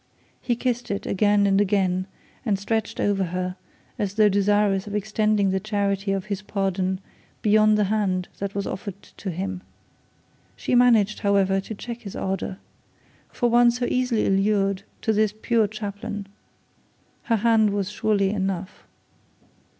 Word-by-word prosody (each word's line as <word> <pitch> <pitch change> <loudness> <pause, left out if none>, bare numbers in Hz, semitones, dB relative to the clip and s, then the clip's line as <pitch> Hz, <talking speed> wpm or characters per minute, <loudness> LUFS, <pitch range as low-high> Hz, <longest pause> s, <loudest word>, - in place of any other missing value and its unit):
He 240 - 0
kissed 245 0 -2
it 200 - -3
again 205 +1 +3
and 195 0 +3
again, 185 -2 +1 0.4
and 210 -5 +1
stretched 215 +2 -2
over 200 -2 +1
her 180 +1 -3 0.4
as 200 -1 -2
though 215 -1 +5
desirous 200 0 +2
of 205 - -4
extending 210 -1 +1
the 190 - +1
charity 200 -1 -1
of 195 -1 -1
his 205 -2 -3
pardon 190 -2 -1 0.4
beyond 215 0 +5
the 210 - +3
hand 195 -3 0
that 200 0 -4
was 200 - -1
offered 195 0 -5
to 195 - -8
him. 185 +1 -4 0.9
She - - -3
managed, 230 -4 +4
however, 195 -1 +2
to 215 +3 -7
check 235 +3 -7
his 200 -4 -9
ardour. 190 0 -3 0.7
For 240 - 0
one 240 0 +6
so 245 +1 -1
easily 250 -3 +1
allured 195 0 +2 0.3
as 220 -1 +3
this 215 -1 +2
poor 225 -1 +2
chaplain, 205 0 -5 1.0
her 230 - +2
hand 220 -1 +3
was 200 -1 -2
surely 205 -2 +1
enough. 195 -2 -3
205 Hz, 150 wpm, -24 LUFS, 195-215 Hz, 1.0 s, one